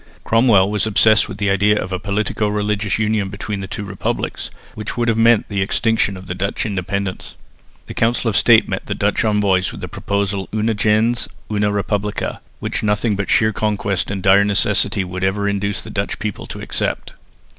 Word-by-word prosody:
Cromwell 110 -4 +4
was 105 +1 0
obsessed 110 0 +4
with - - -7
the 100 -1 +1
idea 105 +2 +3
of 90 - -4
a 95 - -2
politico 105 +2 -1
religious 105 -1 -1
union 105 -2 0
between 100 +1 -5
the 95 - -5
two 105 - -5
republics, 100 -1 -3 0.2
which 110 +2 -6
would 120 0 0
have 115 - +2
meant 115 0 +4
the 100 -2 -2
extinction 100 0 +1
of 95 - -11
Dutch 100 +4 -1
independence. 100 -1 -3 0.5
The - - -8
Council 115 +1 +1
of 110 - 0
State 115 0 +5
met - - -4
the - - -2
Dutch - - +1
envoys 100 -4 +2
with - - -9
the - - -4
proposal 100 -1 -2
una 110 +1 +1
gens, 110 +3 +1 0.2
una 105 -1 +1
respublica, 105 +1 -2 0.2
which - - -3
nothing 105 +1 +1
but 100 0 -3
sheer 110 -1 +3
conquest 100 -3 -1
and 95 -2 -4
dire 100 +1 +6
necessity 100 -1 +1
would 90 0 -5
ever 100 +2 0
induce 100 0 -1
the - - -9
Dutch - - -2
people - - -5
to - - -7
accept. - - -3
105 Hz, 190 wpm, -19 LUFS, 100-110 Hz, 0.5 s, dire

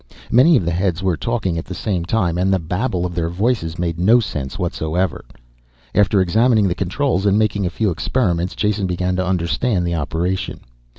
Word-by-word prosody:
Many 140 +6 +6
of 95 - -1
the 85 - 0
heads 90 +1 -1
were 95 -3 +1
talking 95 -4 -2
at 80 - -7
the 95 - -7
same 90 -4 -2
time 90 -3 0
and 95 +1 +2
the 95 - +3
babble 90 +3 -2
of 90 - -4
their 85 -1 -1
voices 90 -3 -1
made 85 -1 -2
no 110 +7 +5
sense 75 - -4
whatsoever. 85 +4 -2 0.7
After 100 -1 +3
examining 110 +3 +3
the 90 - 0
controls 100 +3 -1
and 100 +1 +3
making 105 -3 +1
a - - -1
few 100 +3 -1
experiments, 90 -2 -1
Jason 105 -1 0
began 90 +1 -1
to 95 - +1
understand 90 +2 0
the 85 - -1
operation. 85 +4 -2
95 Hz, 190 wpm, -19 LUFS, 85-105 Hz, 0.7 s, Many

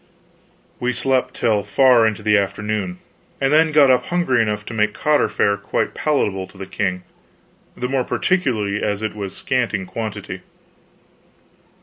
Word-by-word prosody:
We 125 0 0
slept 130 +2 0
till 110 -3 +1
far 115 +3 +4
into 110 -1 -3
the 105 0 +3
afternoon, 100 -1 -1 0.4
and 135 +1 +1
then 160 +1 +4
got 145 -3 +6
up 125 - +2
hungry 175 -9 +1
enough 105 -1 -2
to - - -7
make 105 -1 0
cotter 150 -1 +2
fare 100 0 +1
quite 100 - -2
palatable 100 -11 -1
to 95 - -18
the 95 - -6
king, 90 -2 -2 0.7
the 125 - -2
more 135 0 0
particularly 115 - 0
as 105 0 -2
it 110 - -2
was 100 -2 -6
scant 125 -4 -1
in 95 -2 -4
quantity. 105 +1 -6
110 Hz, 155 wpm, -20 LUFS, 100-130 Hz, 0.7 s, got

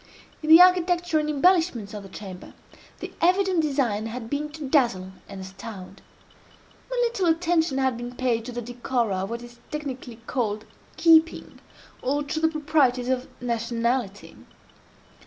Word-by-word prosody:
In 310 - -4
the 325 +1 +10
architecture 350 -2 +3
and 300 0 -2
embellishments 305 - +2
of 210 - -6
the 195 - -12
chamber, 190 -2 -10 0.5
the - - -7
evident 370 0 +3
design 255 -8 0
had 225 0 -7
been 295 +1 -2
to 305 -3 -6
dazzle 235 - +1 0.2
and 195 -1 -8
astound. 190 0 -10 0.9
Little 475 -7 0
attention 330 -3 +1
had 260 -3 +1
been 240 +1 -7
paid 240 -3 0
to 250 - -6
the 240 0 -5
decora 240 -3 -2
of 195 - -4
what 235 +1 -5
is 240 0 -13
technically 265 -5 -6
called 220 -5 -2 0.3
keeping, 325 -1 +3 0.4
or 285 +3 0
to 290 +2 -3
the 320 - +3
proprieties 290 -5 +1
of 260 0 -1
nationality. 235 -2 -2
260 Hz, 145 wpm, -25 LUFS, 230-320 Hz, 0.9 s, the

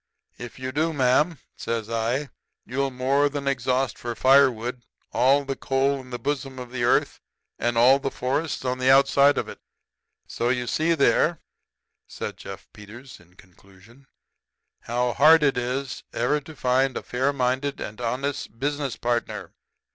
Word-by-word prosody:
"'If 120 -1 -9
you 130 0 -5
do, 160 +4 0
ma'am,' 145 +4 +2 0.2
says 115 -2 -3
I, 115 +5 -2 0.3
'you'll 135 +2 -1
more 135 +3 +1
than 140 -1 -5
exhaust 130 -1 0
for 120 -1 -5
firewood 125 -2 +3 0.3
all 140 +2 +3
the 135 0 -3
coal 135 +1 0
in 130 - -15
the 125 - -4
bosom 135 -1 -3
of 125 -1 -8
the 125 -1 -3
earth 120 - +2 0.4
and 120 0 0
all 130 +4 +6
the 135 - -2
forests 135 +3 -2
on 125 0 -1
the 130 0 +2
outside 140 +1 +5
of - - -1
it.' - - -10 0.7
"So 115 - -4
there, 120 - +3
you 125 -1 -3
see," 160 +6 +1 1.1
said - - -6
Jefferson - - -9
Peters, 120 +5 -12
in 90 +1 -23
conclusion, 100 +8 -20 0.7
"how 120 +1 -1
hard 155 +3 +6
it 140 -2 +3
is 125 +2 -3
ever 145 +5 0
to 155 +2 -12
find 130 0 +1
a - - -5
fair 130 +3 0
minded 135 +1 -1
and 110 +3 -7
honest 125 0 -3
business 140 0 -2
partner." 120 0 -3
130 Hz, 160 wpm, -24 LUFS, 120-140 Hz, 1.1 s, all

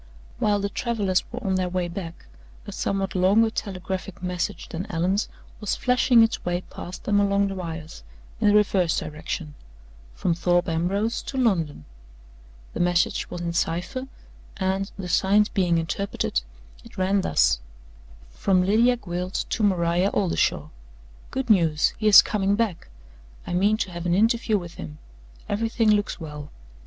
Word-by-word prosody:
While 205 -1 +2
the 200 0 -2
travelers 200 -5 0
were 245 +1 -6
on 190 - +1
their 185 -1 0
way 180 -1 -1
back, 170 -1 -7 0.4
a - - -7
somewhat 195 -1 -2
longer 200 +5 +3
telegraphic 190 -3 -5
message 180 -1 -3
than 175 +5 -5
Allan's 180 +5 0 0.3
was 210 - -1
flashing 250 -1 +4
its 225 - 0
way 175 0 -1
past 180 - -8
them 205 -1 +2
along 200 0 +2
the - - -4
wires, 165 - -7 0.4
in - - +2
the 205 - +5
reverse 195 -5 +3
direction 155 0 -5 0.6
from 170 - 0
Thorpe 175 +1 +1
Ambrose 190 +7 0
to 270 - -6
London. 170 - 0 0.9
The - - -5
message 175 0 +1
was 175 - -6
in 170 -1 -3
cipher, 180 +11 -2 0.5
and, 190 0 -1
the 190 -2 -5
signs 205 +4 +3
being 180 -5 +1
interpreted, 170 +4 -1 0.4
it - - -15
ran 190 +1 +2
thus: 60 - +2 0.7
"From 185 -2 +1
Lydia 235 +5 +4
Gwilt 180 -3 -3
to - - -1
Maria 180 -2 +2
Oldershaw. 190 -4 +1 0.6
Good 265 -1 -3
news! 165 -6 +3
He 215 - +1
is 210 - +10
coming 200 -1 0
back. 215 -6 -2 0.6
I - - -4
mean 200 +4 +3
to 195 -4 -3
have 175 0 -5
an 175 - +2
interview 225 +1 +2
with 175 -3 -7
him. 75 -1 -8 0.5
Everything 225 +1 +1
looks 205 -1 0
well. 150 -2 -8
190 Hz, 155 wpm, -24 LUFS, 175-210 Hz, 0.9 s, is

